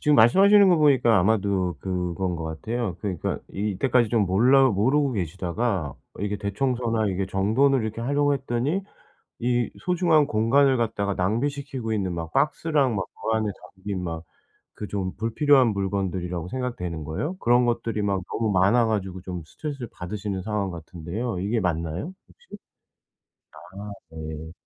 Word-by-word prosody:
지금 150 -1 +3
말씀하시는 195 - +7
거 175 - +5
보니까 130 -8 +4
아마도 100 -2 +1
그건 90 -1 -2
것 80 - -5
같아요. 100 +5 -3
그러니까 95 -6 -2
이 105 +2 -1
이때까지 120 +3 +2
좀 110 -4 +2
몰라 130 +8 +5
모르고 130 +7 +2
계시다가 95 -1 -2 0.2
어 - - -11
이게 105 0 -1
대청소나 115 +2 -1
이게 95 0 -1
정돈을 110 +8 +2
이렇게 110 +1 -4
하려고 145 +3 +2
했더니 135 +7 -1 0.6
이 120 0 +1
소중한 170 -4 +3
공간을 130 +5 +3
갖다가 100 -3 -1
낭비시키고 125 +4 -2
있는 95 -4 -1
막 80 -1 -5
박스랑 145 -3 +1
막 95 -2 -1 0.3
그 - - +3
안에 110 -1 0 0.3
담긴 95 -1 -4
막 80 -1 -4 0.5
그 105 - -6
좀 95 -2 -3
불필요한 130 +4 +3
물건들이라고 95 -4 -2
생각되는 90 - -4
거예요. 145 - -3
그런 120 -2 +3
것들이 115 -2 -1
막 100 -2 0
너무 110 -2 0
많아 100 +5 +4
가지고 95 -4 -2
좀 90 -2 -6
스트레스를 140 - -6
받으시는 95 +1 -5
상황 105 -2 -2
같은데요. 90 +6 -5
이게 110 +4 0
맞나요 85 - -2
혹시? 485 0 -14 1.0
아 100 +4 -9 0.2
네. 80 0 -7
105 Hz, 355 characters per minute, -25 LUFS, 95-125 Hz, 1.0 s, 말씀하시는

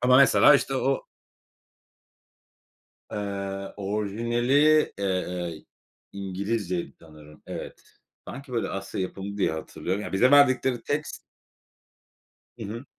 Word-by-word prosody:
Ama 125 +1 +5
mesela 140 +2 +7
işte 135 -1 +1
o 135 +1 0 2.1
Eee, 100 -1 -4
orijinali, 110 +5 -1 0.4
eee, 90 -4 -3 0.5
İngilizceydi 100 -1 -3
sanırım. 75 -2 -16
Evet. - - -7 0.5
Sanki, 140 -1 -9
böyle, 115 - -1
Asya 95 0 -4
yapımı 100 +2 -5
diye 100 - +1
hatırlıyorum. 90 +4 -4
Ya - - -6
bize 125 +8 +4
verdikleri 130 -4 +4
text 150 +2 -3 1.4
Hı - - -5
hı. 115 +6 -7
100 Hz, 100 wpm, -26 LUFS, 95-125 Hz, 2.1 s, mesela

